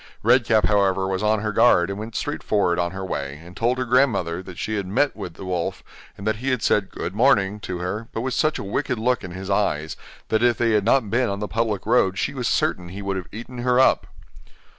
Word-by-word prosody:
Red 120 +2 +4
Cap, 110 -4 +3
however, 95 -2 +2
was 95 0 -2
on 105 0 +2
her 105 0 -1
guard, 100 -5 +4
and 100 - -5
went 110 +1 -7
straight - - -3
forward 90 -4 +1
on 85 0 +1
her 95 +1 -6
way, 70 -5 -4
and 90 +1 -13
told 120 +4 +1
her 130 - -1
grandmother 115 -10 +2
that 95 -2 -11
she 110 - -3
had 100 -2 -3
met 135 +9 +2
the 95 -3 -8
wolf, 90 -2 -3 0.3
and 100 - -8
that 110 0 0
he 130 +4 -3
had 130 -3 0
said 100 -2 +2
'good 90 - -5
morning' 105 -4 +3
to 95 -2 -5
her, 95 +6 -4
but 115 - -3
with 130 +1 -2
such 155 0 +1
a - - -5
wicked 130 +6 -2
look 120 +1 0
in 95 - -6
his 95 +2 -6
eyes, 80 -6 0 0.3
that 110 0 +2
if 120 -1 +3
they 115 -1 +2
had 105 -2 +2
not 115 -3 +2
been 120 +1 +2
on 100 - -2
the 105 +1 -4
public 110 -3 -1
road 100 -4 +2
she - - -1
was 125 -4 -2
certain 90 -4 0
he 100 +3 -7
would 100 0 -2
have 95 -2 -5
eaten 120 +3 -8
her 125 +1 +2
up. 130 - +4
105 Hz, 250 wpm, -23 LUFS, 95-120 Hz, 0.3 s, Red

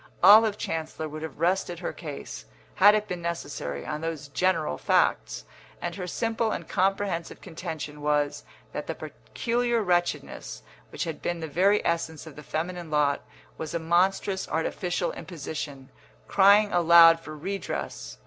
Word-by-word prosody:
Olive 210 +2 +8
Chancellor 160 -2 -4
would 155 +1 -7
have 160 -4 -7
rested 175 +1 0
her 175 - -4
case, 150 -5 -8 0.3
had 205 +2 +7
it 210 0 -1
been 180 -3 -4
necessary, 145 - -4
on 150 0 -4
those 160 -3 -4
general 140 - 0
facts; 60 - +1 0.3
and 175 - -4
her 180 0 -5
simple 225 +3 -1
and - - -4
comprehensive 190 -3 -1
contention 160 -3 -7
was 150 -1 0 0.3
that - - -5
the - - -3
peculiar 240 -1 -2
wretchedness 175 - -1 0.3
which - - -4
had 165 -2 -5
been 175 -1 -2
the 160 - -4
very 195 +7 +2
essence 165 -2 -1
of 155 -3 -11
the 150 - -9
feminine 170 +3 -4
lot 145 -2 +2 0.4
was 160 +1 -4
a - - 0
monstrous 185 +3 +1
artificial 175 +2 -1
imposition, 145 -5 -7 0.4
crying 205 +1 +5
aloud 170 -1 +7
for 155 -2 -9
redress. 195 +6 -5
170 Hz, 150 wpm, -27 LUFS, 155-190 Hz, 0.4 s, Olive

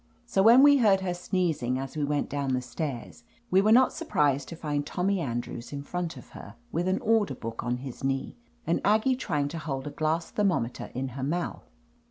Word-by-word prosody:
So 215 -5 +1
when 235 +6 +8
we 285 0 +7
heard 205 -6 +4
her 185 -2 -1
sneezing 170 -8 -1
as 135 +2 -6
we 150 - -1
went 145 0 0
down 140 -2 -1
the 125 - -1
stairs, 120 - -5 0.3
we 190 +1 +5
were 215 +2 +3
not 255 +3 +6
sur 330 0 -7
prised 140 - +2
to 165 - -6
find 150 -3 -2
Tommy 185 +6 -1
Andrews 120 -4 -4
In 140 -1 -5
front 175 +2 -4
of - - -12
her - - -11 0.2
with 175 +2 -1
an 185 - +2
order 215 -10 +2
book 115 -1 -6
on 120 0 -1
his 130 0 -8
knee, 135 0 -1 0.3
and 170 - 0
Aggie 220 +5 +3
try 160 - -1
ing 140 - 0
to 165 +2 -5
hold 135 -4 -4
a 150 - -5
glass 155 +3 -1
thermometer 180 - -1
in 130 +1 -2
her 130 +1 -6
mouth. 170 +5 -3
155 Hz, 220 wpm, -28 LUFS, 135-190 Hz, 0.3 s, when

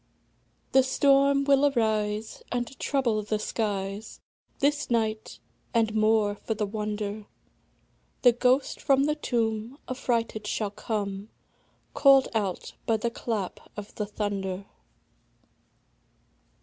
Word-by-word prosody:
The 265 - +6
storm 275 +1 +4
will 280 0 +4
arise, 215 -3 -1
And 245 +1 -3
trouble 245 -7 +1
the 210 +1 -1
skies 205 -1 -3 0.4
This 290 +1 +1
night; 220 -2 -1 0.4
and, 225 -2 +2
more 215 -1 +3
for 220 +2 -4
the 210 0 -1
wonder, 210 0 -4 1.0
The 245 - +8
ghost 250 +3 +1
from 275 -1 +4
the 300 +1 +2
tomb 230 -3 -2
Affrighted 230 -4 -1
shall 210 -1 -1
come, 205 -1 -4 0.6
Call'd 275 -2 +6
out 200 -5 -2
by 225 - +3
the 235 +2 -2
clap 220 -5 -3 0.2
of 210 0 -7
the 210 - -3
thunder. 200 -2 -3
220 Hz, 110 wpm, -27 LUFS, 210-255 Hz, 1.0 s, The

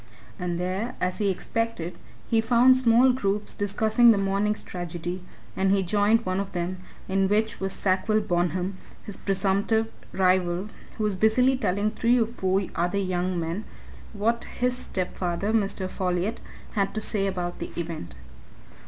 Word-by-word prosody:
And 175 -1 -2
there, 185 +6 -2
as 180 +3 -1
he 205 -2 +2
expected, 190 -2 -2 0.3
he 225 -1 +3
found 245 +3 +5
small 255 0 +5
groups 205 -4 -1
discussing 220 +4 +3
the 225 - +6
morning's 200 +2 0
tragedy, 175 0 -5 0.3
and 190 0 +1
he 195 0 +3
joined 205 +5 +2
one 185 +1 0
of 200 0 -4
them, 180 +1 -3 0.3
in 195 0 +2
which 215 +1 +1
was 195 0 -1
Sackville 195 +4 +1
Bonham, 180 -1 -1 0.3
his 205 - -7
presumptive 200 +4 0 0.2
rival, 185 0 +1 0.3
who 220 - -2
was 210 -2 +1
busily 235 +6 +4
telling 210 -3 0
three 235 +2 +2
or 230 - +3
four 195 -4 0
other 175 +3 0
young 185 -2 -1
men 170 +5 -3 0.5
what 230 +3 0
his 250 0 -1
stepfather, 185 -2 -2
Mr. 200 -3 0
Folliot, 185 +4 -1 0.3
had 200 -1 -1
to - - 0
say 200 -2 +1
about 180 -2 -3
the - - -4
event. 160 - -5
195 Hz, 155 wpm, -26 LUFS, 185-220 Hz, 0.5 s, the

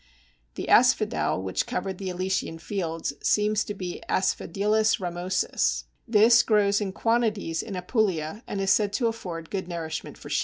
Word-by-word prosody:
The - - -5
Asphodel 95 - +3
which 95 - -1
covered 195 -6 -3
the 190 -1 -4
Elysian 185 -2 -2
fields 165 -4 -3
seems 210 0 +2
to 205 - -5
be 180 -2 -6
Asphodelus 210 +4 +1
ramosus. 180 0 -1 0.2
This 230 +1 +6
grows 205 -2 +2
in 200 -2 -2
quantities 215 -6 0
in 205 - -7
Apulia, 180 -2 -1
and 200 - -3
is 195 0 +2
said 205 -1 +2
to 235 - 0
afford 180 -8 -4
good 190 -3 -3
nourishment 160 -3 -5
for - - -11
sheep. - - +2
195 Hz, 155 wpm, -26 LUFS, 175-215 Hz, 0.2 s, This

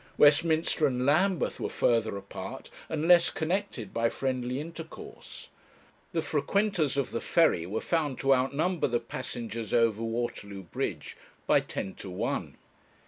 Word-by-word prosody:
Westminster 155 +1 +4
and 125 -1 -1
Lambeth 175 +5 +2
were - - -2
further 115 -3 +1
apart, 100 - -8 0.2
and 160 0 -1
less 175 -1 +7
connected 165 - -2
by 115 0 +2
friendly 130 0 -2
intercourse. 165 +1 -9 0.6
The - - -1
frequenters 195 -9 +1
of 140 -3 0
the 115 - -2
ferry 90 - +3
were 105 +4 -2
found 150 -6 0
to 135 0 +5
outnumber 140 +7 +1
the 120 -2 +1
passengers 115 -2 -4
over 115 -2 +3
Waterloo 115 -4 -3
Bridge 85 - -4 0.3
by - - +5
ten 95 - -5
to 95 - -8
one. 90 - -3
130 Hz, 140 wpm, -29 LUFS, 115-160 Hz, 0.6 s, less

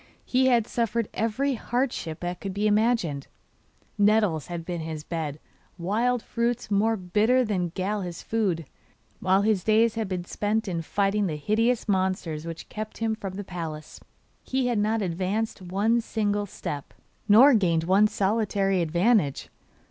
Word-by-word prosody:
He 260 +1 +2
had 240 -4 +4
suffered 230 -1 -1
every 260 +6 0
hardship 240 - -2
that 175 0 -4
could 195 -1 -5
be 205 +1 0
imagined 210 - +1 0.7
nettles 205 -7 +3
had 170 -2 -5
been 175 -2 -4
his 160 -1 -5
bed, 155 -3 -4 0.4
wild 225 +7 0
fruits 235 -1 -2
more 220 +3 +2
bitter 215 +7 +2
than 185 -5 -1
gall 200 +2 -1
his 175 -2 -6
food, 190 -8 -1 0.5
while 190 +1 +3
his 210 -4 +2
days 220 +1 +3
had 225 -2 -2
been 180 -2 -3
spent 215 +3 -1
in 170 -3 -2
fighting 200 +4 0
the 155 - -2
hideous 225 +11 +1
monsters 185 -5 -1
which 165 0 -7
kept 215 0 -6
him 225 -1 0
from 195 -4 -6
the 205 - -5
palace. 165 -5 -7 0.4
He 260 -1 -1
had 240 -3 +1
not 215 +1 +1
advanced 190 +5 -2
one 205 +6 +1
single 205 -2 -1
step, 145 -6 -6 0.3
nor 255 +7 +8
gained 170 -7 +2
one 195 +5 +4
solitary 200 -2 +1
advantage. 170 - +1
205 Hz, 155 wpm, -26 LUFS, 175-225 Hz, 0.7 s, nor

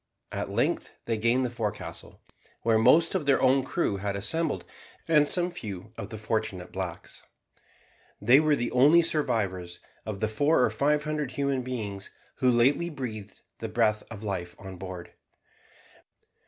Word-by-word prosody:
At - - -3
length - - 0
they 115 - 0
gained 120 +3 +2
the 120 - -3
forecastle, 110 -4 -5 0.4
where 115 -1 +3
most 165 +9 +5
of 170 -7 -1
their 140 - +4
own 130 +1 +4
crew 135 - -1
had 100 0 -2
assembled 160 +12 -1 0.4
and 150 -3 +5
some 180 +2 +1
few 105 - -7
of - - -7
the 110 - -7
unfortunate 110 -4 -3
blacks. 90 -3 -6 1.0
They 120 +7 +6
were 155 -1 +3
the 120 -3 -2
only 150 +7 +6
survivors 95 - -1 0.3
of 105 -3 -5
the 110 - +1
four 145 +6 +3
or 110 - +2
five 145 +6 +1
hundred 150 -3 -3
human 140 -1 0
beings 105 -6 -5 0.3
who 130 - +3
lately 130 +8 +3
breathed 110 - -7 0.2
the - - -4
breath 105 0 +2
of 110 -2 -8
life 90 -4 -4
on 95 -2 -9
board. 90 -1 -8
115 Hz, 155 wpm, -28 LUFS, 100-145 Hz, 1.0 s, They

